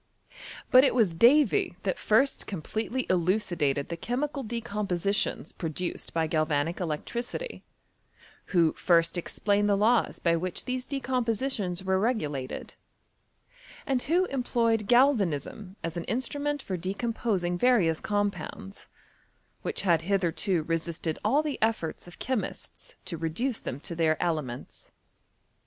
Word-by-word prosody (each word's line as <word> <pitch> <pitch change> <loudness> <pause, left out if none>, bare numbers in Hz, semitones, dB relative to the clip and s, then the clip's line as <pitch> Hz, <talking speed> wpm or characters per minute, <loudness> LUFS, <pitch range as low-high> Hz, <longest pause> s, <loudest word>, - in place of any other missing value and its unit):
But 255 +1 +8
it 275 - +3
was 215 -9 +3
Davy 235 - +4
that 190 - -1
first 265 +6 +2
completely 220 - -3
elucidated 170 -6 +1
the 170 - -3
chemical 275 - -2
decompositions 210 -5 -1
produced 170 +2 -4
by 165 -1 +1
galvanic 155 0 0
electricity, 235 - -4 0.8
who 170 -4 +3
first 165 -1 +3
explained 205 +4 +1
the 200 - +4
laws 225 +4 +3
by 170 -1 +2
which 180 +1 -4
these 255 0 -2
decompositions 245 -7 -1
were 190 0 +1
regulated, 150 - -2 1.1
and 265 -2 +1
who 345 +7 +2
em 275 -7 -2
ployed 230 -3 +1
galvanism 215 - +2
as 165 -1 -3
an 170 - -4
instrument 285 +5 -2
for 185 - -3
decomposing 195 -1 -1
various 175 -7 +3
compounds, 205 -1 -3 0.7
which 445 - -1
had 170 -4 +3
hitherto 180 -1 +1
resisted 165 0 -2
all 275 +8 +3
the 300 -2 -3
efforts 220 -8 -1
of 175 - -12
chemists 255 -4 -4
to 170 - -4
reduce 180 +11 -1
them 130 - -5
to 170 - -5
their 160 -1 +2
ele 165 -3 +1
ments. 125 -2 -9
200 Hz, 125 wpm, -28 LUFS, 170-240 Hz, 1.1 s, But